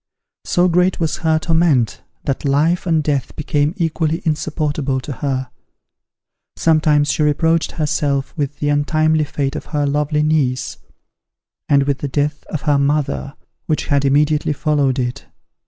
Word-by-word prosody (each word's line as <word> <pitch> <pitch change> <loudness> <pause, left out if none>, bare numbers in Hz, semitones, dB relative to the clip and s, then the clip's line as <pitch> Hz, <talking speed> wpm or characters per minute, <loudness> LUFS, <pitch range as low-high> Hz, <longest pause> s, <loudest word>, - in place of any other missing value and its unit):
So 175 +1 +2
great 180 +1 +2
was 160 -2 -1
her 160 -1 +1
torment, 160 -7 +1 0.2
that 135 - -2
life 155 +6 +1
and 160 -2 +2
death 140 -3 -1
became 150 +2 0
equally 160 -2 -1
insupportable 150 -3 -1
to 135 - -7
her. 130 0 -3 1.0
Sometimes 150 -2 +3
she - - -1
reproached 160 +2 +1
herself 145 -3 -1
with 145 -2 -3
the 145 - -1
untimely 155 +1 +2
fate 140 0 -3
of - - -5
her 150 -2 -1
lovely 150 +1 0
niece, 135 -5 0 0.9
and 140 -1 +4
with 140 -1 -1
the 145 - -3
death 145 +1 -1
of 155 - -5
her 145 -3 +2
mother, 140 0 -1 0.3
which 155 - 0
had 140 -2 +2
immediately 150 +2 +2
followed 145 -3 +1
it. 125 -1 -3
150 Hz, 145 wpm, -18 LUFS, 140-155 Hz, 1.0 s, and